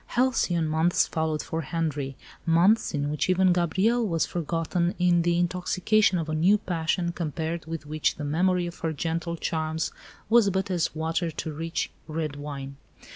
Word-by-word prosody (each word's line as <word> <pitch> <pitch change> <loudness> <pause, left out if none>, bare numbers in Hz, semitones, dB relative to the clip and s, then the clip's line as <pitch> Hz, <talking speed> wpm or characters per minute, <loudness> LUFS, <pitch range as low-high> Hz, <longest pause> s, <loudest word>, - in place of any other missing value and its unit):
Halcyon 225 -10 +2
months 160 +3 +2
followed 160 -1 -1
for 165 - -3
Henri 145 -3 -2 0.3
months 175 +4 +3
in 145 0 -1
which 150 +4 -1
even 185 0 +4
Gabrielle 190 +8 +2
was 165 -3 +1
forgotten 170 +2 -1
in 175 -1 +3
the 170 0 +2
intoxication 185 +3 +2
of 165 -2 -2
a 155 - -3
new 180 +7 +4
passion, 170 -2 -1
compared 165 0 -3
with 160 -2 -5
which 155 +1 0
the 150 - -6
memory 180 +4 +1
of 175 0 -7
her 160 -1 -1
gentle 170 +3 -2
charms 160 0 -2 0.4
was 225 -2 +5
but 190 0 -1
as 175 -3 0
water 165 +2 -1
to 160 0 -5
rich, 165 +3 -3 0.2
red 155 -2 -3
wine. 140 -1 -7
165 Hz, 165 wpm, -26 LUFS, 155-180 Hz, 0.4 s, was